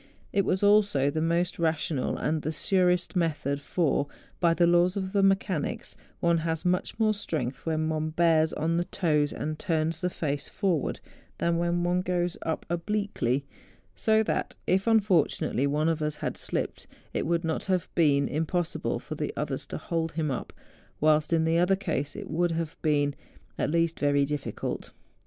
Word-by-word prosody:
It 200 -1 +2
was 185 +2 0
also 205 -10 +4
the 155 - -1
most 170 +2 0
rational 160 -4 0
and 155 +1 -1
the 155 - -2
surest 180 0 +1
method; 145 -5 0
for, 145 -2 0 0.3
by 170 -2 +3
the 175 - +4
laws 175 +3 +3
of 190 0 -3
mechanics, 195 -5 +1 0.3
one 170 -1 +3
has 160 0 -2
much 180 0 0
more 220 -1 +3
strength 150 - -4
when 155 -1 0
one 155 0 -1
bears 160 -1 +3
on 165 +2 0
the 175 - 0
toes 150 -5 +1
and 155 0 -4
turns 160 -3 0
the 180 - +1
face 145 -5 -3
forwards, 180 -8 -1 0.4
than 170 0 +1
when 175 0 +1
one 175 +1 +1
goes 180 -1 -1
up 160 - -3
obliquely; 170 - -1 0.5
so 220 0 +3
that - - -2
if 190 +4 +1
unfortunately 195 - +2
one 150 +2 +1
of 165 -1 0
us 150 -1 -1
had - - -3
slipped - - -3 0.3
it - - -1
would 170 +1 +1
not 160 -1 -2
have 185 -3 0
been 145 -4 +3
im¬ 155 +2 -1
possible 175 -1 -1
for - - -7
the - - -3
others - - -3
to - - -5
hold 165 -3 -2
him 155 -3 -1
up, 130 - -4 0.5
whilst 155 +1 +3
in 165 -1 +3
the 165 +1 +2
other 180 +2 +4
case 155 -7 -3
it - - -6
would 170 +2 0
have 165 -1 -3
been 145 -2 +2 0.4
at - - -1
least 165 +1 +1
very 145 -1 +3
difficult. 140 -6 -4
165 Hz, 175 wpm, -28 LUFS, 155-180 Hz, 0.5 s, also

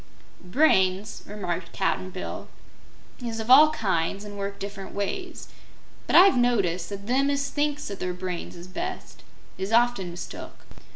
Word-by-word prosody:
"Brains," 190 -3 +2
remarked 180 -4 -4
Cap'n 190 -1 -1
Bill, 185 0 -6 0.8
"is 230 -1 -3
of 220 +3 -1
all 300 +4 +9
kinds 195 - -1
and 205 -1 -8
work 200 0 -4
different 195 -1 -7
ways. 350 - -4 0.6
But - - +1
I've 380 +2 +8
noticed 195 -8 +1
that 200 0 -7
them 265 +5 +2
as 280 0 -1
thinks 295 0 -1
that 200 -1 -6
their 180 - -2
brains 180 -1 -5
is 175 0 -10
best 185 0 -6 0.4
is 190 +2 -3
often 235 -5 +3
mistook." 175 0 -9
200 Hz, 150 wpm, -26 LUFS, 185-245 Hz, 0.8 s, all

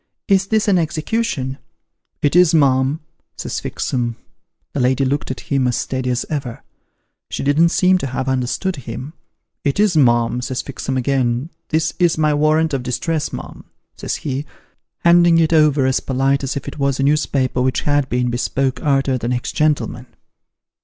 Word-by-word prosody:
' - - -62
Is 190 0 0
this 220 0 +1
an 190 -3 +4
execution? 155 - -2 0.3
' - - -55
'It 145 +2 +2
is, 175 -2 +5
mum,' 135 0 +2 0.4
says - - -4
Fixem. 120 -2 -2 0.6
The - - -2
lady 130 +2 +2
looked 140 +2 -1
at 130 - -5
him 135 -3 0
as 125 - 0
steady 130 -1 -2
as 125 0 -1
ever: 135 -6 -5 0.7
she - - -4
didn't 150 +4 +4
seem 185 +1 +3
to 135 - -3
have 130 +1 -3
understood 130 +8 -1
him. 130 +3 -7 0.3
' - - -58
It 140 +5 0
is, 205 -4 +3
mum,' 120 -3 +3
says 130 0 -3
Fixem 135 -1 -4
again; 130 +2 0
' - - -53
this 160 0 0
is 175 -3 +3
my 155 -1 +2
warrant 155 +1 +2
of 135 - 0
distress, 140 +6 -2
mum,' - - -8 0.3
says - - -3
he, 140 0 -4 0.6
handing 170 -1 +6
it 165 0 +3
over 150 -3 +4
as 130 0 +2
polite 135 +1 0
as 135 +1 -2
if - - -7
it - - -7
was 140 -1 0
a - - +1
newspaper 140 -3 +1
which 130 0 +1
had 145 -2 +1
been 125 0 0
bespoke 130 +2 -1
arter 135 -3 +1
the 115 - -3
next 120 0 -2
gentleman. 155 -1 0
140 Hz, 180 wpm, -19 LUFS, 130-155 Hz, 0.7 s, handing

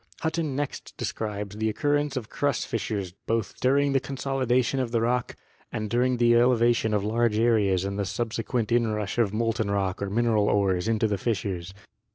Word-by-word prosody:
Hutton 160 -3 -1
next 145 0 -5
describes 105 -2 -4
the 110 0 0
occur 145 +7 0
rence 145 -1 -1
of 115 -4 -4
crust 140 0 -1
fissures 100 -4 -3 0.2
both 115 -1 -1
during 140 +2 +2
the 135 - +4
consolidation 135 -1 0
of 130 -2 -1
the 115 0 +1
rock 120 +2 0 0.4
and 110 -1 -4
during 125 +1 +2
the 120 0 +4
elevation 120 -2 +3
of 100 - 0
large 115 +1 +1
areas 105 -5 +2
and 100 +1 -3
the 100 - 0
sub 115 +3 -3
sequent 115 -1 -2
inrush 110 -3 0
of 110 -4 +2
molten 115 0 0
rock 100 -2 -1
or 100 - -2
mineral 110 -1 +2
ores 95 -2 +1
into 110 0 +2
the 100 -2 -1
fissures. 95 -4 -3
115 Hz, 185 wpm, -26 LUFS, 105-125 Hz, 0.4 s, the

